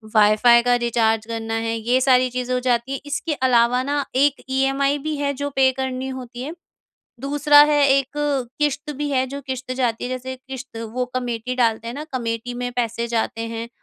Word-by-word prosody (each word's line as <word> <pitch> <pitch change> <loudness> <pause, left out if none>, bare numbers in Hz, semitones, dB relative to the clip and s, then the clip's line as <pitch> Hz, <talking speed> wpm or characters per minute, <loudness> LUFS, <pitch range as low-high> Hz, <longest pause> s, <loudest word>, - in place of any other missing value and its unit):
Wifi 215 +3 +6
का 245 0 +3
recharge 225 -2 +1
करना 225 0 -4
है 225 - -1
ये 240 +3 +1
सारी 255 -1 +4
चीज़ें 250 0 -3
हो 250 - +1
जाती 250 +1 0
है, 275 - -3
इसके 295 +2 -2
अलावा 250 -2 +3
ना 285 0 -1
एक 280 +1 +2
ईएमआई 270 +2 +1
भी 305 - -1
है 280 0 -1
जो 285 +1 -3
पे 265 -1 +4
करनी 260 0 -3
होती 250 -2 -7
है। 305 +4 -5 0.7
दूसरा 290 +1 +5
है 290 -1 +4
एक 275 0 +2 0.5
किश्त 295 +1 0
भी 295 0 -2
है 260 -1 +1
जो 280 +2 -6
किश्त 260 -1 -5
जाती 245 -3 -1
है - - -3
जैसे 255 +1 -4
किश्त 260 -1 -9 0.2
वो 250 0 -1
कमिटी 245 -1 -3
डालते 230 -2 +1
हैं 235 - -5
ना, 295 +3 -5
कमिटी 235 -1 -3
में 245 0 -3
पैसे 235 -1 -2
जाते 225 0 -1
हैं, 230 0 -5
255 Hz, 195 wpm, -22 LUFS, 235-270 Hz, 0.7 s, Wifi